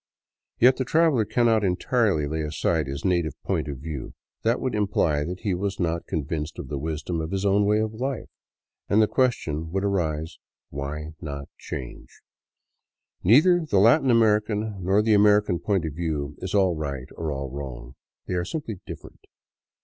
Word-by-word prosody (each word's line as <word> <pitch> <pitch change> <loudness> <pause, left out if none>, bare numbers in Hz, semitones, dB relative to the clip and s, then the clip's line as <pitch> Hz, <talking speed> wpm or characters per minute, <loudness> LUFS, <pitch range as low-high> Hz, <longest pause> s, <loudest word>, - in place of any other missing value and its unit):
Yet 125 +2 +5
the 130 - 0
traveler 150 -4 +3
cannot 115 -1 +2
entirely 95 - +1
lay 80 +2 -2
aside 75 0 0
his 70 +5 -5
native 85 -5 0
point - - -1
of 70 -2 -5
view; 75 -1 -7 0.3
that 115 +2 +1
would 130 - -2
imply 95 -8 +1
that 90 +4 -5
he 105 -4 0
was 100 +2 -2
not 85 -2 -1
convinced 75 0 -3
of - - -7
the 70 -2 -3
wisdom 80 +2 -3
of 80 - -4
his 95 +2 -2
own 100 +1 +3
way 105 +1 +3
of 110 0 -1
life, 130 +2 -3 0.6
and 105 - +4
the 110 - +6
question 80 - 0
would 95 +2 -1
arise, 80 -5 -1 0.3
Why 75 +3 -5
not 70 -2 -6
change? 65 -3 -7 1.1
Neither 160 - +5
the 145 -11 0
Latin 125 +8 +5
American 105 -3 +2
nor 100 +4 +3
the 110 0 +3
American 105 -3 +4
point 95 -5 0
of 80 - -4
view 75 -3 -3
is 95 +2 -4
all 95 -4 +3
right 70 -4 -5
or 80 -2 -3
all 70 -2 -4
wrong; 65 -3 -7 0.3
they - - -4
are 90 -1 0
simply 110 - -5
different. - - -11
90 Hz, 170 wpm, -25 LUFS, 75-105 Hz, 1.1 s, the